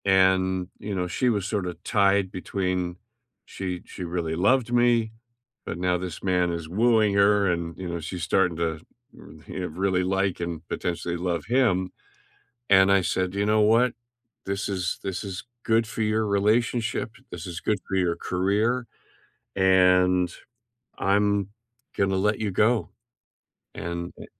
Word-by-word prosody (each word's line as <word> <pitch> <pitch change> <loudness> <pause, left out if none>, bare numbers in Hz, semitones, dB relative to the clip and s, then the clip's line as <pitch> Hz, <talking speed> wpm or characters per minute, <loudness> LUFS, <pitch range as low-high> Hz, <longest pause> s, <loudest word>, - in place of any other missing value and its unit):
And, 95 -1 +3
you 100 -1 -4
know, 90 -1 -1
she 125 +8 0
was 100 -5 0
sorta 95 -4 -2
tied 100 -3 +2
between 90 -1 -2 0.5
she 90 -2 -5
she 90 - -8
really 85 -2 -2
loved 120 +7 +2
me, 120 -2 +3 0.5
but 85 - -5
now 90 0 +1
this 90 -2 -6
man 90 -2 +1
is 85 -2 -5
wooing 110 +2 +3
her 100 -1 +4
and, 85 -1 -3
you 95 -1 -5
know, 85 0 -3
she's 85 +2 -6
starting 90 +1 +2
to, 80 -2 -1 0.7
you - - -6
know, 90 - -2
really 95 +2 0
like 95 0 0
and 85 -1 -5
potentially 85 0 -3
love 85 -3 -2
him. 105 -7 +2 0.8
And 95 0 +6
I 100 -1 +4
said, 95 +1 -1
"You 100 +1 0
know 110 +1 +3
what? 115 +3 +4 0.5
This 100 +1 -2
is 95 -3 -2
this 95 +1 -4
is 95 -2 -6 0.2
good 115 0 +2
for 115 0 -4
your 110 0 +1
relationship, 110 +3 +1 0.2
this 85 0 -7
is 85 -2 -6
good 105 - 0
for 95 - -1
your 90 -3 +1
career, 105 +7 0 0.7
and 90 -1 +4 0.7
I'm 100 0 +1 0.5
gonna 95 -1 +1
let 105 +2 +1
you 105 -2 -1
go, 105 0 +2 0.9
and, 85 +1 -5
eh" - - -9
95 Hz, 155 wpm, -25 LUFS, 90-105 Hz, 0.9 s, And